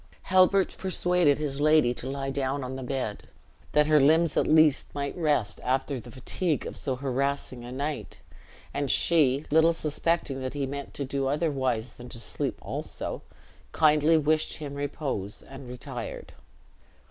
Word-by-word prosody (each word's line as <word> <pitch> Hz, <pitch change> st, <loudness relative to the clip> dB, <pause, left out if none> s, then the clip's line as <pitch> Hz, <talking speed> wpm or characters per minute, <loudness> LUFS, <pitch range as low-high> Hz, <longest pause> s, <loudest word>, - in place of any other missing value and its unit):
Halbert 185 Hz, +1 st, +3 dB
persuaded 180 Hz, -5 st, +2 dB
his 145 Hz, -2 st, -3 dB
aldy 150 Hz, -5 st, +4 dB
to 130 Hz, -, -4 dB
lie 135 Hz, 0 st, -3 dB
down 135 Hz, 0 st, -1 dB
on 130 Hz, +1 st, -5 dB
the 130 Hz, -, -6 dB
bed, 125 Hz, -4 st, -4 dB, 0.5 s
that 150 Hz, 0 st, +5 dB
her 155 Hz, -1 st, +5 dB
limbs 160 Hz, +3 st, +4 dB
at -, -, +2 dB
least 155 Hz, -3 st, +4 dB
might 140 Hz, -1 st, -3 dB
rest 145 Hz, -, +1 dB
after 130 Hz, +1 st, 0 dB
the 120 Hz, -, -11 dB
fatigue 150 Hz, +6 st, -2 dB
of -, -, -6 dB
so 135 Hz, -3 st, -2 dB
harassing 135 Hz, -1 st, -2 dB
a 120 Hz, -, -8 dB
night; 145 Hz, +3 st, -4 dB, 0.6 s
and 140 Hz, -1 st, -1 dB
she, 145 Hz, -4 st, +3 dB
little 160 Hz, +2 st, +5 dB
suspecting 155 Hz, -3 st, -1 dB
that 130 Hz, +2 st, -4 dB
he 140 Hz, -1 st, -1 dB
meant 140 Hz, +1 st, -6 dB
to 140 Hz, -, -2 dB
do 135 Hz, 0 st, -1 dB
otherwise 135 Hz, -6 st, -1 dB
than 125 Hz, 0 st, -10 dB
to 115 Hz, -, -7 dB
sleep 115 Hz, -, -3 dB
also, -, -, -4 dB, 0.5 s
kindly 155 Hz, +1 st, +4 dB
wished 155 Hz, +1 st, +1 dB
him 145 Hz, -3 st, -6 dB
repose 140 Hz, -8 st, -4 dB
and 135 Hz, -1 st, -11 dB
retired. 125 Hz, 0 st, -7 dB
140 Hz, 160 wpm, -27 LUFS, 130-155 Hz, 0.6 s, that